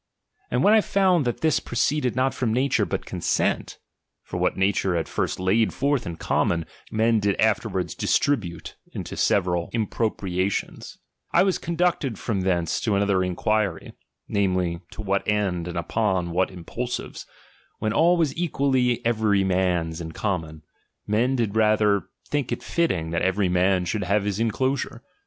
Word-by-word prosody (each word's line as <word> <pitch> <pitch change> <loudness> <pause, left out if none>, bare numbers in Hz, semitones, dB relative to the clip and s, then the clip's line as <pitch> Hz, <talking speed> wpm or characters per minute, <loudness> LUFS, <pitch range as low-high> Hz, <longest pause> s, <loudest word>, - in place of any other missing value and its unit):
And 125 +2 +1
when 205 - +6
I 220 - +6
found 185 -7 +2
that 120 - -2
this 160 -2 +3
proceeded 125 +1 0
not 130 +1 +1
from 125 -4 -1
nature, 130 +4 +1
but - - -3
consent; - - -1 0.5
(for - - -6
what - - 0
nature 95 -1 +1
at 80 - -1
first - - -2
laid 100 +5 +2
forth 140 -4 0
in 85 - -4
common, 85 0 0 0.2
men 110 +1 +2
did 100 -1 0
after 110 -3 +2
wards 90 -4 -2
distribute 90 - -1 0.2
into - - -6
several 90 -3 +1
impropriations) 100 -4 -2
j - - -38 0.3
I - - +6
was 190 -1 +1
conducted 170 - 0
from 100 -4 -2
thence 90 -3 0
to 105 -3 +1
another 100 -2 +2
inquiry; 95 0 -1 0.3
namely, 90 -4 0
to 110 - -8
what 100 -1 -1
end 95 -5 0
and 90 0 -5
upon 95 -1 0
what 90 +2 +1
impulsives, 120 +7 -5 0.5
when 110 0 -1
all 170 +7 +4
was 160 -5 +1
equally 135 -8 +1
every 110 -4 +2
man's 90 -3 0
in 80 -1 -7
common, 80 -6 -3 0.4
mea. 120 +5 +1
did 110 -4 -1
rather 105 -3 +3 0.2
think 145 -4 -2
it 120 - -3
fitting 90 - 0
that 85 - 0
every 95 0 +1
man 90 0 +2
should 105 +1 -2
have 100 +2 +1
his 100 0 -2
inclosure. 130 +4 -1
105 Hz, 160 wpm, -24 LUFS, 90-125 Hz, 0.5 s, when